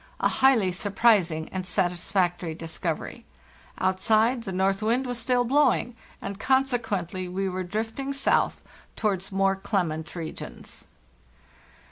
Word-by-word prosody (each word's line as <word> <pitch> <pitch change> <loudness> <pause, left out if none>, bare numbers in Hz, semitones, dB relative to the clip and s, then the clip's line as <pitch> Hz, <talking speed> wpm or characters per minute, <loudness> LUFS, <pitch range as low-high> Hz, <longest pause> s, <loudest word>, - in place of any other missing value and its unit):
A - - +3
highly 235 -9 +4
surprising 190 -4 +2
and 185 -1 -4
satisfactory 175 -2 0
discovery. 165 0 -4 0.5
Outside, 220 +6 +2
the 195 - -4
north 195 +2 +1
wind 235 +5 +1
was 245 -1 -3
still 245 +1 +2
blowing, 255 -2 +2 0.2
and 200 0 -6
consequently 220 -10 0
we 190 +2 -2
were 185 0 -3
drift 220 +6 -4
ing 275 0 -2
south 275 0 +1 0.3
towards 195 -3 -1
more 195 0 +2
clement 175 -5 -2
regions. 165 -2 -7
195 Hz, 120 wpm, -26 LUFS, 180-235 Hz, 0.5 s, highly